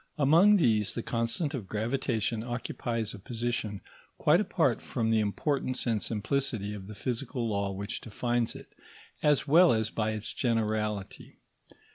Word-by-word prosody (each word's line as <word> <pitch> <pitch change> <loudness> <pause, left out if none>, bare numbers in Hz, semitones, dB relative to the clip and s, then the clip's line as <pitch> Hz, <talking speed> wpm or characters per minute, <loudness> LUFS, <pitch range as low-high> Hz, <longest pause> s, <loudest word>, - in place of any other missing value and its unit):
Among 165 +9 +6
these, 110 - +2
the 115 - -3
constant 115 +6 -1
of 115 -9 -5
gravitation 115 0 -1
occupies 120 -2 -3
a - - -9
position 115 -2 -3 0.4
quite - - +4
apart - - +1
from 115 -1 -1
the 110 - +4
importance 130 +5 -1
and 115 -4 +1
simplicity 110 -1 -1
of 95 -2 -8
the 105 - -9
physical 125 +2 -3
law 100 -2 -1
which 100 +2 -5
defines 120 +1 -1
it, - - -12 0.5
as 150 -1 +3
well 170 +5 +7
as 110 -1 +1
by 110 -1 -1
its 110 0 -5
generality. 110 -4 -2
115 Hz, 145 wpm, -29 LUFS, 105-130 Hz, 0.5 s, well